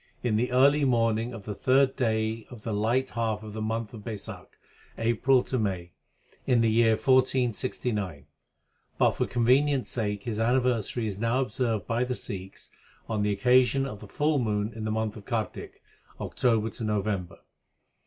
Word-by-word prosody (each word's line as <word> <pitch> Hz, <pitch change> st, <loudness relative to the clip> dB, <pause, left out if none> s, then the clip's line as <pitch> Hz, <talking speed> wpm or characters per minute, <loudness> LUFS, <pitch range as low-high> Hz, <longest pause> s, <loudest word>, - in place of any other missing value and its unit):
in 120 Hz, -3 st, +1 dB
the 125 Hz, +3 st, 0 dB
early 140 Hz, +3 st, +5 dB
morningjpf 115 Hz, -3 st, +1 dB
the 105 Hz, -, -5 dB
third 135 Hz, +4 st, +3 dB
day 110 Hz, -2 st, -1 dB
oL 125 Hz, -, -8 dB
th 110 Hz, 0 st, -5 dB
light 120 Hz, +5 st, +1 dB
half 110 Hz, -2 st, -2 dB
of 105 Hz, -1 st, -8 dB
thp 110 Hz, -, -5 dB
month 110 Hz, +1 st, -3 dB
of 110 Hz, -, -8 dB
Raisakh 110 Hz, -3 st, -7 dB, 0.5 s
(April 120 Hz, +3 st, +2 dB
May) 95 Hz, -5 st, -2 dB, 0.6 s
in 125 Hz, -3 st, +4 dB
the__ySr_ 115 Hz, 0 st, +4 dB
AiD._ 110 Hz, -, -4 dB
1469; 125 Hz, -, +1 dB, 0.7 s
but -, -, +4 dB
for -, -, -2 dB
convenience 130 Hz, +3 st, +2 dB
sake 105 Hz, -4 st, -2 dB
his 110 Hz, -3 st, -3 dB
anniversary 120 Hz, -1 st, +1 dB
is 100 Hz, -2 st, -4 dB
now 115 Hz, +3 st, +1 dB
observed 115 Hz, -4 st, -1 dB
by 115 Hz, +2 st, 0 dB
the 125 Hz, 0 st, -2 dB
Sikhs 95 Hz, -6 st, -7 dB, 0.4 s
on 110 Hz, -2 st, -1 dB
the 105 Hz, 0 st, +1 dB
occasion 125 Hz, +6 st, +3 dB
of 105 Hz, -7 st, -6 dB
the 105 Hz, -, -11 dB
full 150 Hz, +6 st, +1 dB
moon 105 Hz, -2 st, -1 dB
in 110 Hz, 0 st, -6 dB
the 110 Hz, -, -1 dB
month 110 Hz, -1 st, -1 dB
of 100 Hz, -, -12 dB
Kartik 115 Hz, -2 st, -4 dB, 0.4 s
(October 115 Hz, -3 st, 0 dB
November). 100 Hz, -4 st, -2 dB
115 Hz, 160 wpm, -27 LUFS, 105-125 Hz, 0.7 s, early